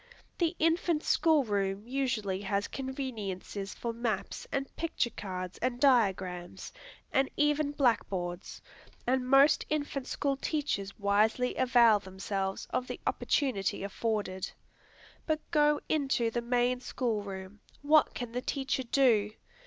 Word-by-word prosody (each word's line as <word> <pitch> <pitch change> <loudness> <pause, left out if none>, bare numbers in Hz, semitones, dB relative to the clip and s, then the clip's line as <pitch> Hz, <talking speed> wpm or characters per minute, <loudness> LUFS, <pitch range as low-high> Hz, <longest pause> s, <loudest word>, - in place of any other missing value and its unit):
The 340 -1 +1
infant 330 -1 +2
school 315 -4 +3
room 200 -1 -1
usually 240 -8 -1
has 200 +1 -1
conveniences 220 -8 -5
for 235 -1 -3
maps 230 -4 -3
and 275 0 -3
picture 320 -7 -1
cards 185 -3 -6
and 245 0 -1
diagrams, 190 -9 +1 0.4
and 270 0 +3
even 295 0 +2
blackboards; 195 -10 -1 0.4
and 255 0 0
most 275 +2 +6
infant 290 -3 -2
school 275 -1 -1
teachers 275 -11 -2
wisely 215 +5 +2
avail 240 -4 +5
themselves 190 0 -4
of 255 - -1
the - - -5
opportunity 205 -11 0
afforded. 200 -2 -2 0.8
But 310 -1 +1
go 295 -2 +4
into 270 -6 +1
the 240 - -1
main 245 +1 +1
school 240 -3 -2
room 195 0 -8 0.2
what 305 +1 +4
can 245 -2 -4
the 250 +1 -2
teacher 270 0 -1
do? 235 -5 +3
240 Hz, 125 wpm, -30 LUFS, 200-275 Hz, 0.8 s, most